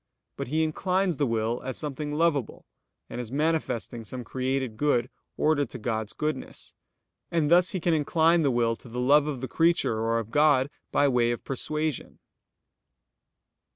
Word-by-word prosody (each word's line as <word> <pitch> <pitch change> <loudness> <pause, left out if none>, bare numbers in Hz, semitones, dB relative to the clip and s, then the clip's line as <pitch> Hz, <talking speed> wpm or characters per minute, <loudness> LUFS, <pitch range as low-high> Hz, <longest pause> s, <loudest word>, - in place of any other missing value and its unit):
But - - -5
he 155 +5 +1
inclines 180 +2 0
the 145 - +1
will 115 +1 -1
as 130 - -4
something 150 0 -3
lovable, 150 -5 0 0.4
and 125 - -5
as 120 -1 -8
manifesting 145 -6 -1
some 125 +3 -7
created 130 0 -2
good 130 -1 +1 0.3
ordered 145 -4 +2
to - - -7
God's 110 -2 -3
goodness. 155 0 -4 0.6
And 160 -2 0
thus 180 +1 +5
he 185 - -2
can 170 0 +1
incline 160 +2 +3
the 145 - +2
will 120 -2 +1
to 125 - -14
the 120 +2 -5
love 145 +4 +4
of 140 -5 -4
the 130 - -3
creature 165 -9 +2
or 115 +1 +1
of 115 -1 -4
God, 145 -2 +3 0.2
by 145 - +3
way 120 -3 +2
of 120 - -3
persuasion. 150 +2 -3
140 Hz, 165 wpm, -27 LUFS, 120-155 Hz, 0.6 s, thus